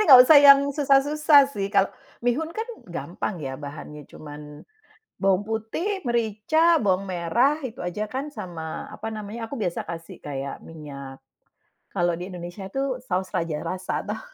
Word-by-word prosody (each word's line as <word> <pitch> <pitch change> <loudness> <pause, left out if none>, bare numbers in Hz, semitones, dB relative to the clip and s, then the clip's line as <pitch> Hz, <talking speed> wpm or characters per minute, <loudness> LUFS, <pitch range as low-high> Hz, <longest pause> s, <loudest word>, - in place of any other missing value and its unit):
enggak 255 -2 +11
usah 295 +1 +9
yang 280 -1 +9
susah-susah 290 +2 +4
sih. 195 -1 -2
Kalo 200 -2 +3 0.3
mihun 295 +7 +1
kan, 445 - -1 0.2
gampang 195 - -4
ya, 135 - -4
bahannya, 145 0 -9
cuma 150 -1 -11 0.9
bawang 195 +1 +2
putih, 270 - -2
merica, 240 +9 +2
bawang 195 -1 +1
merah, 235 - +2
itu 230 - -12
aja 180 +4 -3
kan, 265 +2 -2
sama, 165 - -6
apa - - -8
namanya, 215 +2 -6
aku - - -6
biasa 175 -2 -1
kasih 170 +2 -7
kayak 140 -1 -4
minyak, 140 -4 -9 0.8
kalau 175 -1 +2
di 180 - -5
Indonesia 175 +2 -7
itu 270 +3 -2
Saus 185 0 -1
Raja 165 -2 -1
Rasa 185 +1 -3
tuh. - - -3
200 Hz, 150 wpm, -25 LUFS, 170-270 Hz, 0.9 s, enggak